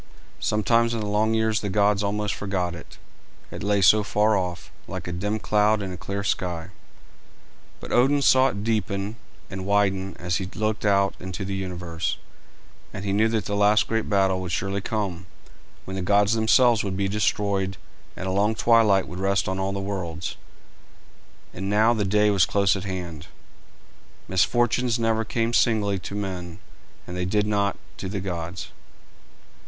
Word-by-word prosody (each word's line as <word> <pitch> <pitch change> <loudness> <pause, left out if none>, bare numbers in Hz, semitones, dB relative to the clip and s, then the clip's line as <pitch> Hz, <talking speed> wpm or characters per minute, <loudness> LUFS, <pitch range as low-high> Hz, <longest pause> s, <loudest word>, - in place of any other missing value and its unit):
Sometimes 115 +2 +2
in - - -2
the 105 - -3
long 105 +2 +1
years 110 -1 +1
the 105 - -3
gods 100 +1 +2
almost 105 0 -1
forgot 95 -3 -2
it, 80 -8 -11 0.5
it - - -7
lay 100 0 +1
so 105 +4 +6
far 105 +1 +2
off, 90 -3 -3 0.2
like - - -6
a - - -3
dim 105 +5 -2
cloud 105 0 +2
in 95 - -4
a - - -5
clear 100 +3 -4
sky; 85 -3 -2 1.1
but - - -9
Odin 140 +3 +3
saw 130 +1 +5
it 100 -5 -4
deepen 105 -1 -1 0.3
and 95 -1 -6
widen 95 -1 0
as 90 0 -1
he 95 -2 -4
looked 110 0 -1
out 100 -1 +3
into 95 +1 -5
the 100 - -4
universe, 90 -3 -3 0.7
and 100 - -7
he 100 - 0
knew 110 +2 +3
that 110 -3 -1
the 100 - -2
last 105 +1 +4
great 115 0 -1
battle 95 -2 +2
would 90 -2 -5
surely 100 +3 -1
come, 95 -4 -3 0.6
when 95 - -7
the 95 - -3
gods 100 +3 +3
themselves 115 +1 +4
would 95 -2 -3
be 100 -1 0
destroyed 100 -1 0 0.4
and - - -5
a 95 - -1
long 105 +3 +1
twilight 110 -5 +4
would 90 +3 -7
rest 100 +1 +1
on 95 0 -2
all 95 +1 -1
the 100 - -3
worlds; 95 -4 -4 1.2
and 95 +2 -4
now 110 +3 +4
the 110 -3 0
day 105 +2 +3
was 95 -4 +3
close 100 -1 +2
at 95 - -5
hand. 90 -6 -6 1.0
Misfortunes 120 +6 +2
never 115 -1 +1
come 115 +1 -1
singly 105 -5 +2
to 100 - -7
men, 90 -4 -5 0.5
and 90 - -7
they 90 - -2
did 105 +3 +1
not 100 -1 0 0.2
to 95 - -5
the 100 +1 -3
gods. 90 -2 -5
100 Hz, 175 wpm, -24 LUFS, 95-105 Hz, 1.2 s, so